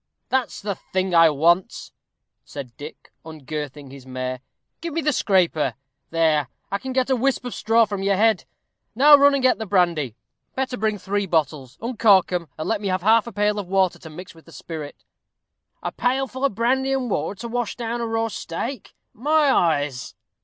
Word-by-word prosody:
"That's 260 -2 -1
the 205 -1 -1
thing 185 0 -3
I 165 -1 +7
want," 170 +5 +1 0.5
said 130 -5 -9
Dick, 150 +2 -11
ungirthing 150 -2 -7
his 135 -1 -11
mare. 130 0 -4 0.4
"Give 335 -2 -5
me 330 - 0
the 300 -1 +1
scraper. 165 - +1 0.3
There, 160 -4 +2 0.2
I 200 - -1
can 265 - -6
get 260 0 0
a - - +4
whisp 255 +1 0
of 245 - -4
straw 225 +1 +3
from 200 -2 -4
your 195 0 +2
head. 215 -1 +2 0.5
Now 290 +5 +8
run 285 0 +5
and 270 - -1
get 255 -2 +3
the 220 - -4
brandy. 170 - +1 0.4
Better 260 -1 -2
bring 215 -1 -1
three 200 +1 -2
bottles. 150 -6 -1
Uncork 220 -6 +4
'em, 175 -2 -2
and 155 - -4
let 220 -2 -1
me 205 - -3
have 185 -1 -1
half 225 +2 +4
a - - -6
pail 210 0 0
of 200 - -6
water 190 -1 +1
to 160 - -11
mix 175 +4 -10
with 165 -1 -19
the 165 - -16
spirit." 155 -3 -8 0.8
"A - - -2
pail 260 +2 0
full 260 +1 -3
of 270 - 0
brandy 265 +4 +1
and 265 -2 -1
water 175 +5 -2
to 235 - -5
wash 240 -1 -3
down 235 0 -3
a 230 - -2
raw 225 0 0
steak! 225 +5 -6 0.2
My 295 +4 +2
eyes!" 145 - 0
200 Hz, 195 wpm, -23 LUFS, 160-240 Hz, 0.8 s, Now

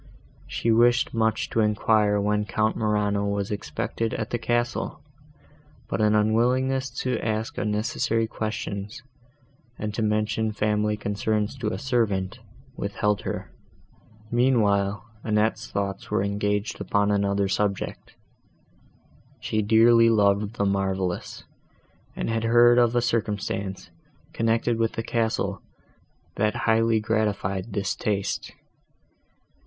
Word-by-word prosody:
She 115 - 0
wished 120 +2 +3
much 110 -1 0
to - - 0
enquire 105 -1 +2
when 105 +1 0
Count 110 +1 0
Morano 105 -2 0
was 100 +1 -2
expected 110 +2 -3
at 110 -1 -4
the 120 - -1
castle, 120 0 -1 0.8
but - - -2
an 105 0 +3
unwillingness 125 +5 +2
to 125 -3 -1
ask 110 0 -2
unnecessary 110 +2 0
questions, 105 +1 -5 0.7
and 105 0 -4
to 115 - -2
mention 110 0 0
family 105 0 0
concerns 105 +2 -1
to 115 - -2
a - - -3
servant, 115 -6 -1 0.4
withheld 105 0 -1
her. - - -5 0.8
Meanwhile, 105 -5 +2 0.2
Annette's 110 +1 0
thoughts 100 -1 -3
were - - +1
engaged 105 +1 -1
upon 100 0 +1
another 100 -1 +1
subject: 100 0 -2 1.2
she 110 - -1
dearly 115 +2 +5
loved 105 0 +2
the 100 - 0
marvellous, 95 -2 -2 0.7
and - - -3
had 115 0 -1
heard 120 +1 +6
of 120 0 +3
a 120 - +2
circumstance, 105 -4 -2 0.4
connected 115 0 +1
with 115 -1 +1
the 115 - -3
castle, 115 -1 -1 0.8
that 105 +1 +1
highly 115 0 +3
gratified 105 -2 -1
this 100 -2 -1
taste. 100 -2 -2
110 Hz, 115 wpm, -25 LUFS, 100-115 Hz, 1.2 s, heard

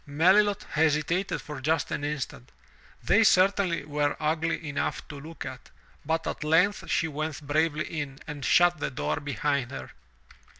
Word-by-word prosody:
'' - - -34 0.2
Melilot 205 +2 +5
hesitated 160 +4 +1
for 150 -3 -7
just 155 +1 0
an 145 - -3
instant 145 - -4 0.3
— - - -27
they 225 - +4
certainly 185 -5 +3
were 145 -1 -1
ugly 160 +1 -1
enough 145 -1 -3
to 145 - -8
look 160 +3 -8
at - - -8 0.2
— - - -30
but 160 0 0
at - - -4
length 180 +7 +2
she 165 - +1
went 155 0 -4
bravely 155 +1 +1
in 145 -4 -5
and 145 -3 -7
shut 175 +4 +4
the - - -1
door 130 - -2
behind 140 -1 -1
her. - - -8
155 Hz, 170 wpm, -27 LUFS, 145-165 Hz, 0.3 s, Melilot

